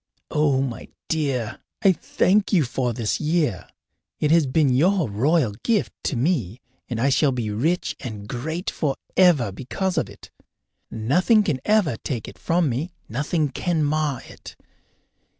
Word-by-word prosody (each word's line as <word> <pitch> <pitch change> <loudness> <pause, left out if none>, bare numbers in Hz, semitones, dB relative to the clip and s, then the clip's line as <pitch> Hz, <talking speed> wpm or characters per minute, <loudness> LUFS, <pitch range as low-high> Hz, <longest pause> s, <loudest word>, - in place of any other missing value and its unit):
Oh, 145 -3 +2
my 125 -4 -5 0.2
dear, 135 -8 -1 0.2
I 195 - +7
thank 195 +3 +1
you 180 -7 +4
for 125 0 -1
this 115 -2 -1
year! 150 - 0 0.5
It 150 - +1
has 165 -3 +4
been 135 0 +2
your 175 +5 +3
royal 125 +5 +2
gift 225 -4 0
to - - 0
me, 125 - 0 0.3
and 120 -3 -3
I 135 +4 +3
shall 135 +1 +3
be 120 -4 -2
rich 155 +12 0
and 105 -4 -7
great 160 - -3
forever 150 - +2
because 180 - -2
of - - -3
it. - - -14 0.6
Nothing 180 - +3
can 155 -9 -1
ever 205 - +2
take 120 -3 -4
it - - -11
from 170 -1 +1
me, 140 +8 -2
nothing 150 +5 -1
can 160 +4 -1
mar 150 -3 0
it. - - -12
145 Hz, 150 wpm, -23 LUFS, 120-170 Hz, 0.6 s, I